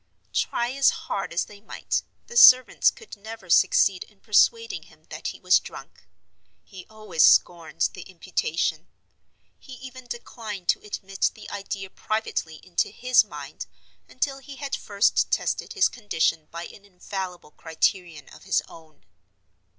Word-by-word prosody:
Try 240 Hz, +1 st, 0 dB
as 275 Hz, +1 st, +4 dB
hard 195 Hz, -1 st, -4 dB
as 170 Hz, -, 0 dB
they 205 Hz, -1 st, -15 dB
might, -, -, -3 dB, 0.2 s
the 475 Hz, -, -12 dB
servants 255 Hz, -, +7 dB
could 445 Hz, -, -12 dB
never 215 Hz, -3 st, -9 dB
succeed 185 Hz, +2 st, +4 dB
in 210 Hz, -2 st, -26 dB
persuading 220 Hz, -5 st, +2 dB
him 155 Hz, -1 st, -22 dB
that 155 Hz, +1 st, -5 dB
he -, -, -6 dB
was 185 Hz, 0 st, +4 dB
drunk; -, -, -12 dB, 0.6 s
he 190 Hz, -3 st, -13 dB
always 215 Hz, -7 st, -3 dB
scorned 170 Hz, -3 st, +4 dB
the -, -, -9 dB
imputation. 170 Hz, -2 st, -2 dB, 0.7 s
He 265 Hz, -, -12 dB
even 255 Hz, 0 st, -11 dB
declined 220 Hz, -5 st, -7 dB
to -, -, +2 dB
admit 195 Hz, -2 st, -2 dB
the 215 Hz, -, -11 dB
idea 195 Hz, -1 st, -6 dB
privately 215 Hz, -7 st, -3 dB
into 180 Hz, -2 st, -1 dB
his 250 Hz, +4 st, +3 dB
mind, -, -, -9 dB, 0.4 s
until 270 Hz, +1 st, -2 dB
he 275 Hz, +1 st, -11 dB
had 275 Hz, 0 st, -4 dB
first 205 Hz, -1 st, +1 dB
tested -, -, -1 dB
his 400 Hz, -, +4 dB
condition 165 Hz, -8 st, -1 dB
by 170 Hz, +1 st, -7 dB
an 200 Hz, -, -13 dB
infallible 185 Hz, -3 st, -7 dB
criterion 160 Hz, -1 st, -2 dB
of -, -, -15 dB
his -, -, +1 dB
own. 155 Hz, -, -17 dB
200 Hz, 145 wpm, -25 LUFS, 175-235 Hz, 0.7 s, servants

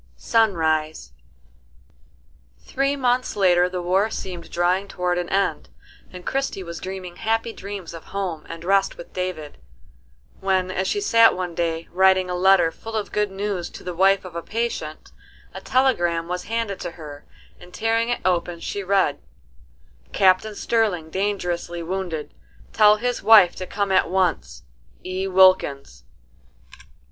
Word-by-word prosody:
SUNRISE. 160 Hz, -, 0 dB, 1.5 s
Three 275 Hz, +1 st, -1 dB
months 255 Hz, -2 st, 0 dB
later 180 Hz, -3 st, +3 dB
the 180 Hz, -1 st, -4 dB
war 190 Hz, +5 st, +2 dB
seemed 180 Hz, -5 st, -6 dB
drawing 180 Hz, +3 st, 0 dB
toward 180 Hz, -2 st, -1 dB
an 175 Hz, -, -4 dB
end, 195 Hz, +1 st, -1 dB, 0.4 s
and 180 Hz, -1 st, -11 dB
Christie 270 Hz, -8 st, -2 dB
was 170 Hz, -1 st, -7 dB
dreaming 185 Hz, -2 st, -7 dB
happy 225 Hz, +1 st, -1 dB
dreams 195 Hz, -4 st, -8 dB
of 165 Hz, -, -10 dB
home 185 Hz, -6 st, -4 dB
and 165 Hz, 0 st, -8 dB
rest 195 Hz, +2 st, +1 dB
with 170 Hz, -, -12 dB
David, 180 Hz, -5 st, -5 dB, 0.8 s
when, 190 Hz, -1 st, 0 dB
as 190 Hz, 0 st, -2 dB
she 410 Hz, -, -1 dB
sat 230 Hz, -, +5 dB
one 180 Hz, -2 st, -4 dB
day 165 Hz, 0 st, -2 dB
writing 185 Hz, 0 st, +3 dB
a -, -, -2 dB
letter 180 Hz, -2 st, +4 dB
full 225 Hz, +6 st, -9 dB
of 215 Hz, -2 st, -3 dB
good 210 Hz, -1 st, 0 dB
news 195 Hz, -2 st, -3 dB
to -, -, -12 dB
the 180 Hz, -, -5 dB
wife 195 Hz, +2 st, +3 dB
of 175 Hz, -2 st, -10 dB
a 170 Hz, -, -3 dB
patient, 210 Hz, -8 st, -4 dB, 0.4 s
a -, -, -8 dB
telegram 175 Hz, -11 st, +1 dB
was 180 Hz, +1 st, -4 dB
handed 225 Hz, -3 st, -3 dB
to -, -, -5 dB
her, 150 Hz, -3 st, -10 dB, 0.4 s
and 180 Hz, 0 st, -15 dB
tearing 225 Hz, +3 st, 0 dB
it 240 Hz, -, -1 dB
open 175 Hz, -1 st, 0 dB
she 200 Hz, -, -4 dB
read: 190 Hz, -7 st, +1 dB, 0.9 s
"Captain 195 Hz, +3 st, +3 dB
Sterling 200 Hz, -9 st, 0 dB
dangerously 175 Hz, -3 st, -2 dB
wounded. 175 Hz, -3 st, -4 dB, 0.4 s
Tell 210 Hz, 0 st, +6 dB
his 245 Hz, +3 st, -2 dB
wife 210 Hz, -6 st, +7 dB
to 185 Hz, -, -6 dB
come 200 Hz, -1 st, -2 dB
at 185 Hz, -3 st, +3 dB
once. 180 Hz, -, -1 dB, 0.4 s
E. 185 Hz, +1 st, -3 dB
WILKINS." 180 Hz, -, +3 dB
185 Hz, 150 wpm, -22 LUFS, 175-205 Hz, 1.5 s, wife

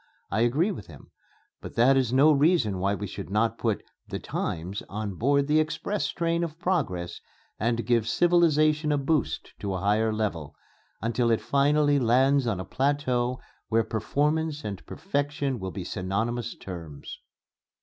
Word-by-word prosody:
I 105 Hz, -, 0 dB
agree 145 Hz, -, +2 dB
with 105 Hz, -, -8 dB
him, -, -, -14 dB, 0.5 s
but -, -, -9 dB
that 125 Hz, +4 st, +5 dB
is 130 Hz, -3 st, +2 dB
no 140 Hz, +4 st, +6 dB
reason 140 Hz, -, +3 dB
why 100 Hz, +2 st, +1 dB
we 105 Hz, -, -5 dB
should 95 Hz, -, -7 dB
not 110 Hz, +3 st, +1 dB
put -, -, -1 dB, 0.2 s
'the -, -, -4 dB
times' 90 Hz, +5 st, -4 dB
on 105 Hz, 0 st, -4 dB
board 140 Hz, +8 st, +2 dB
the 150 Hz, +2 st, +3 dB
express 170 Hz, +6 st, -1 dB
train 170 Hz, 0 st, 0 dB
of 165 Hz, -2 st, -4 dB
progress 135 Hz, -, -2 dB, 0.4 s
and 115 Hz, +2 st, 0 dB
give 115 Hz, -2 st, +2 dB
civilization 155 Hz, -1 st, +3 dB
a 145 Hz, -, +2 dB
boost 140 Hz, 0 st, -1 dB
to 100 Hz, -2 st, -3 dB
a -, -, -2 dB
higher 105 Hz, +3 st, +2 dB
level, 105 Hz, -9 st, -3 dB, 0.5 s
until 115 Hz, +1 st, +1 dB
it 115 Hz, -, +3 dB
finally 145 Hz, +1 st, +3 dB
lands 130 Hz, +2 st, +3 dB
on 105 Hz, -5 st, -1 dB
a 95 Hz, -, -4 dB
plateau 130 Hz, -2 st, 0 dB, 0.3 s
where 115 Hz, 0 st, +3 dB
performance 150 Hz, +7 st, -1 dB
and 100 Hz, -3 st, -5 dB
perfection 145 Hz, -, -2 dB
will 95 Hz, -1 st, -4 dB
be 95 Hz, -, -5 dB
synonymous 110 Hz, +6 st, -2 dB
terms." 85 Hz, -6 st, -8 dB
125 Hz, 160 wpm, -27 LUFS, 105-150 Hz, 0.5 s, no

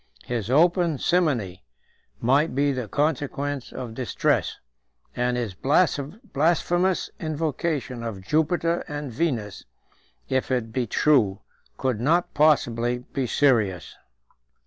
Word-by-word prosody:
His 115 Hz, -3 st, -3 dB
open 170 Hz, +2 st, +3 dB
simony 125 Hz, -, 0 dB, 0.6 s
might 135 Hz, +5 st, +2 dB
be 140 Hz, +1 st, +2 dB
the 125 Hz, -4 st, -3 dB
consequence 145 Hz, +1 st, -2 dB
of 125 Hz, -3 st, -6 dB
distress; 125 Hz, +1 st, 0 dB, 0.6 s
and 125 Hz, 0 st, 0 dB
his 115 Hz, -5 st, -3 dB
blasphemous 170 Hz, -, +1 dB
invocation 155 Hz, -4 st, -2 dB
of 110 Hz, -5 st, -5 dB
Jupiter 165 Hz, -, +1 dB
and 145 Hz, -2 st, -5 dB
Venus, 115 Hz, -, -2 dB, 0.6 s
if 130 Hz, -1 st, -1 dB
it 120 Hz, -4 st, -1 dB
be 125 Hz, -1 st, -1 dB
true, 110 Hz, -8 st, +2 dB, 0.4 s
could 125 Hz, -4 st, -1 dB
not 170 Hz, +7 st, +2 dB
possibly 125 Hz, -5 st, +2 dB
be 135 Hz, -3 st, -1 dB
serious. 110 Hz, -, +1 dB
135 Hz, 105 wpm, -25 LUFS, 120-155 Hz, 0.6 s, open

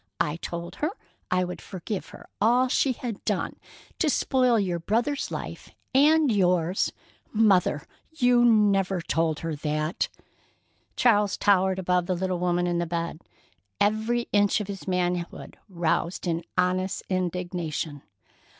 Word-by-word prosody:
I 150 Hz, +2 st, 0 dB
told 170 Hz, +2 st, -6 dB
her 305 Hz, -, 0 dB, 0.4 s
I 185 Hz, 0 st, +2 dB
would 180 Hz, 0 st, -5 dB
forgive 195 Hz, +2 st, -5 dB
her -, -, -13 dB, 0.2 s
all 245 Hz, +4 st, +4 dB
she 260 Hz, +1 st, +2 dB
had 235 Hz, -4 st, -6 dB
done -, -, -2 dB, 0.4 s
to 320 Hz, -, +2 dB
spoil 255 Hz, -4 st, +2 dB
your 180 Hz, -4 st, -1 dB
brother's 235 Hz, -, 0 dB
life -, -, -6 dB, 0.2 s
and 300 Hz, +1 st, +5 dB
yours——" 180 Hz, -3 st, +2 dB, 0.4 s
"Mother! 195 Hz, -9 st, +3 dB, 0.3 s
You 245 Hz, -5 st, +3 dB
never 200 Hz, -5 st, +3 dB
told 160 Hz, -2 st, 0 dB
her 165 Hz, -2 st, -3 dB
that!" 155 Hz, +2 st, -1 dB, 0.9 s
Charles 210 Hz, -4 st, +3 dB
towered 190 Hz, -2 st, +3 dB
above 180 Hz, -1 st, +1 dB
the 185 Hz, -, 0 dB
little 185 Hz, 0 st, -2 dB
woman 175 Hz, 0 st, +1 dB
in 175 Hz, -1 st, 0 dB
the 170 Hz, -, -1 dB
bed, 170 Hz, 0 st, -3 dB, 0.6 s
every 220 Hz, +3 st, +1 dB
inch 205 Hz, 0 st, +3 dB
of 210 Hz, -, -4 dB
his 195 Hz, -1 st, -7 dB
manhood 180 Hz, -1 st, -2 dB
roused 170 Hz, 0 st, -1 dB
in 170 Hz, -1 st, -1 dB
honest 185 Hz, +1 st, 0 dB
indignation. 175 Hz, -5 st, -3 dB
185 Hz, 135 wpm, -26 LUFS, 175-215 Hz, 0.9 s, and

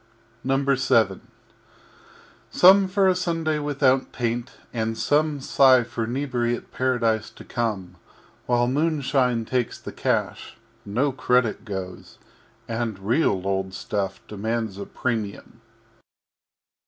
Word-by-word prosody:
VII 130 Hz, -6 st, +2 dB, 1.3 s
Some 190 Hz, +2 st, +6 dB
for 195 Hz, +1 st, +2 dB
a 185 Hz, -, +5 dB
Sunday 165 Hz, -4 st, -1 dB
without 140 Hz, -3 st, +1 dB
Taint, 120 Hz, 0 st, -3 dB, 0.2 s
and 115 Hz, -1 st, -2 dB
Some 145 Hz, +5 st, +1 dB
Sigh 130 Hz, -2 st, +5 dB
for 115 Hz, 0 st, -4 dB
Inebriate 120 Hz, -1 st, -2 dB
Paradise 115 Hz, -4 st, 0 dB
to -, -, -14 dB
come, 100 Hz, -7 st, -3 dB, 0.5 s
While 120 Hz, 0 st, +2 dB
Moonshine 135 Hz, -4 st, +1 dB
takes 125 Hz, 0 st, -2 dB
the -, -, -8 dB
Cash -, -, -2 dB, 0.3 s
(no 125 Hz, +8 st, 0 dB
Credit 125 Hz, -3 st, +1 dB
goes) 95 Hz, -4 st, -7 dB, 0.5 s
And 115 Hz, -3 st, -3 dB
real 100 Hz, -, +1 dB
old 95 Hz, -1 st, -2 dB
Stuff 100 Hz, 0 st, -3 dB
demands 110 Hz, -1 st, -3 dB
a 100 Hz, -, -6 dB
Premium. 115 Hz, -1 st, -4 dB
120 Hz, 105 wpm, -24 LUFS, 110-135 Hz, 1.3 s, Some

